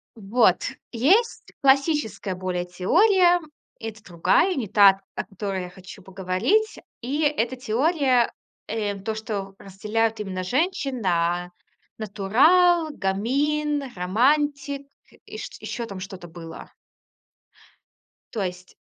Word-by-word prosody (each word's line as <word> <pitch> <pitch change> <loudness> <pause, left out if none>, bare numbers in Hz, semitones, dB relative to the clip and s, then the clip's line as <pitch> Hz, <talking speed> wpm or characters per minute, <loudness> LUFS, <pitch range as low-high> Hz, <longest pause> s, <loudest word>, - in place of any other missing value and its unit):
Вот, 220 +3 +2 0.3
есть 365 - +2
классическая 275 - +2
более 180 -1 -3
теория. 355 - +4 0.4
Это 220 -1 -7
другая, 180 - +2
не 230 -6 -2
та, 195 -1 +6
о - - -2
которой 195 -2 -4
я 180 - -7
хочу 185 +1 -13
поговорить. 190 - 0 0.2
И 285 +6 -2
эта 260 -4 +1
теория, 255 +1 +1 0.4
э, 210 -2 -2
то, 220 +3 -4
что 200 -3 -5
разделяют 215 +3 -2
именно 185 -3 -4
женщин 275 - -1
на 175 -1 0 0.5
натурал, 305 - +3
гамин, 285 +9 0
романтик, 280 +8 +1 0.4
и - - -9
чт - - -8
ещё 235 -2 -4
там 195 -3 -8
что-то 185 -2 -8
было. 165 -1 -10 1.6
То 215 - -3
есть, 180 0 -7
220 Hz, 110 wpm, -24 LUFS, 190-285 Hz, 1.6 s, та